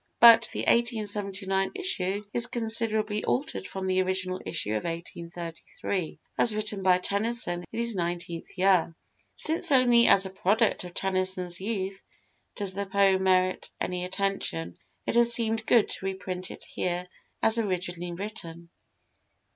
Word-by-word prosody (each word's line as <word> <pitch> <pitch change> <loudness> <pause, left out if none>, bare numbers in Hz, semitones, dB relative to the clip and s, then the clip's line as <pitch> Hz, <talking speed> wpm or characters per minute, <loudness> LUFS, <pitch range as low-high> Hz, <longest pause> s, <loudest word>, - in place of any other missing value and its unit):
But 230 0 +8
the - - -3
1879 205 -4 0
issue 205 - -1
is 240 0 +4
considerably 220 -3 0
altered 100 -5 -2
from 190 -1 -5
the 185 0 +2
original 185 0 -1
issue 155 -11 -1
of 110 -1 -1
1833, 170 +1 -5 0.2
as 220 -3 +6
written 215 -2 -1
by 185 -1 +4
Tennyson 200 -2 -1
in 225 - -4
his 235 0 +1
nineteenth 175 -2 -4
year. 185 -3 +3 0.4
Since 325 +1 -1
only 245 -3 +5
as 195 0 +6
a 190 - -6
product 200 +2 +1
of 175 - -10
Tennyson's 185 -2 -2
youth 195 -2 -3 0.5
does 200 -3 0
the 200 +1 -4
poem 195 -1 +3
merit 185 0 +2
any 180 0 -2
attention, 180 - -3 0.3
it - - -1
has 235 0 +5
seemed 225 -1 +1
good 235 -3 +5
to - - -6
reprint 185 -1 -5
it - - -10
here 180 0 -3 0.4
as 225 +1 +5
originally 180 -4 -3
written. 170 -3 -7
190 Hz, 140 wpm, -27 LUFS, 180-220 Hz, 0.5 s, But